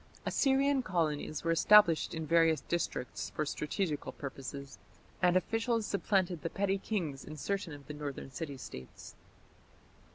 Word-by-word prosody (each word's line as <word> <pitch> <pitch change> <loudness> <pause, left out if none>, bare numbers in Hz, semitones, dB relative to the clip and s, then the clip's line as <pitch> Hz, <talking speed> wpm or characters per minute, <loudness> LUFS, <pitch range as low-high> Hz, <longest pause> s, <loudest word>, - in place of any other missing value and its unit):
Assyrian 275 0 +3
colonies 155 - -1
were 165 - +1
established 170 -1 +6
in 160 -1 -3
various 165 -2 +4
districts 150 -5 -3
for 155 - 0
strategical 150 +1 -2
purposes, 140 0 -7 0.4
and 180 0 +5
officials 225 +3 0
supplanted 190 -4 0
the 165 - -2
petty 195 +1 0
kings 170 -10 -3
in 155 - -8
certain 195 +2 -2
of 145 -1 -10
the 150 - -7
northern 145 -2 -6
city 140 0 -5
States. 65 - -10
165 Hz, 135 wpm, -32 LUFS, 145-195 Hz, 0.4 s, established